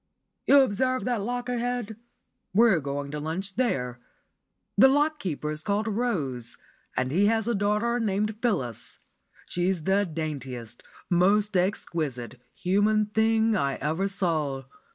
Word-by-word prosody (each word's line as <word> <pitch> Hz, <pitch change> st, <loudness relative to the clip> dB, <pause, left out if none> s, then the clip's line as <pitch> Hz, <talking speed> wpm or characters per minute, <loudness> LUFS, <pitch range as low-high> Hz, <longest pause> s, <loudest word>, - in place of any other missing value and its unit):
You 280 Hz, 0 st, +8 dB
observe 255 Hz, +2 st, +1 dB
that 245 Hz, -4 st, 0 dB
lock 245 Hz, +3 st, -3 dB
ahead? 245 Hz, -2 st, -2 dB, 0.6 s
We're 220 Hz, -5 st, +5 dB
going 140 Hz, 0 st, -4 dB
to 150 Hz, -, -4 dB
lunch 185 Hz, +6 st, -4 dB
there. 125 Hz, -, -1 dB, 0.8 s
The 265 Hz, -, +8 dB
lock 295 Hz, +3 st, +2 dB
keeper 150 Hz, -, -3 dB
is 155 Hz, 0 st, -3 dB
called 205 Hz, +5 st, -1 dB
Rose, 155 Hz, -, -2 dB, 0.4 s
and 130 Hz, 0 st, 0 dB
he 195 Hz, +7 st, +3 dB
has 225 Hz, 0 st, +1 dB
a 235 Hz, -, +2 dB
daughter 210 Hz, +4 st, +1 dB
named 215 Hz, 0 st, 0 dB
Phyllis. 130 Hz, -, -2 dB, 0.5 s
She's 175 Hz, -1 st, -1 dB
the 195 Hz, +3 st, +2 dB
daintiest, 135 Hz, -8 st, -5 dB, 0.3 s
most 200 Hz, +4 st, +3 dB
exquisite, 150 Hz, -, -1 dB
human 205 Hz, +3 st, +2 dB
thing 220 Hz, 0 st, +3 dB
I 140 Hz, -8 st, 0 dB
ever 160 Hz, +7 st, -1 dB
saw. 160 Hz, -8 st, -1 dB
195 Hz, 130 wpm, -27 LUFS, 150-225 Hz, 0.8 s, You